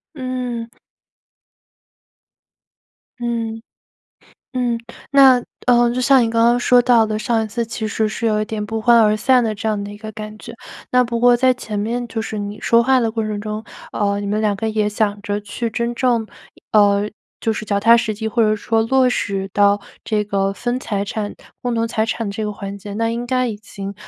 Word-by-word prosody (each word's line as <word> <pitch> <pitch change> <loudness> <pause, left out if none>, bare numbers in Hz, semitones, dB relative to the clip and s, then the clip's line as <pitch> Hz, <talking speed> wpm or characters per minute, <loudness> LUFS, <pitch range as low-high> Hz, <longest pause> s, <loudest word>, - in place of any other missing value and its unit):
嗯。 250 -3 -4 2.5
嗯。 230 -2 -3 0.9
嗯。 245 -2 0 0.4
那， 265 -3 +7 0.3
呃， 240 -1 +5
就 255 - -1
像 265 +1 +5
你 - - 0
刚 230 0 +2
刚 240 +1 +4
说 245 0 +4
到 235 -2 +4
的 215 0 -2
上 225 +1 0
一 - - -4
次 235 +3 -2
其 225 -1 -4
实 215 +1 0
是 220 +2 -3
有 215 -1 +1
一 - - -1
点 215 0 -4
不 225 +1 -3
欢 235 +1 +5
而 215 -1 +4
散 250 +3 +3
的 220 -1 -1
这 215 +2 -3
样 210 -2 -1
的 205 - -7
一 205 - -9
个 215 +1 -8
感 215 0 -8
觉。 230 - -9 0.4
那 250 0 +4
不 235 -1 -3
过 245 0 +6
在 255 +1 +3
前 215 -4 -5
面， 235 +4 -2
就 225 - -3
是 220 -1 -5
你 205 0 -5
说 235 0 +4
话 260 +1 +3
的 225 -2 0
过 225 -1 -1
程 215 -1 -3
中， 215 +1 -4 0.3
呃， 200 -1 0
你 205 - -4
们 210 +2 0
两 210 -2 +1
个 220 +3 -2
也 215 -1 0
想 205 -1 -1
着 205 -1 -2
去 225 +3 -4
真 235 +1 -2
正 235 -3 +1 0.5
呃， 205 -1 +4 0.3
就 225 - 0
是 215 - -5
脚 200 -1 0
踏 230 +3 +6
实 220 -2 0
地， 220 +1 -5
或 230 +1 +1
者 215 -1 +3
说 225 +1 0
落 255 +2 +3
实 195 -5 -2
到 205 0 +3 0.2
这 210 -2 -1
个 195 -1 0
分 245 +4 -3
财 200 -5 -2
产 205 +1 -4 0.3
共 245 -1 -1
同 230 0 0
财 220 -1 0
产 225 -1 -3
这 200 +2 -4
个 210 - -3
环 200 0 -7
节， 200 +1 -9
那 225 +2 0
应 235 +1 -3
该 255 0 +1
已 225 - -3
经 200 -2 -8
220 Hz, 225 characters per minute, -19 LUFS, 210-240 Hz, 2.5 s, 那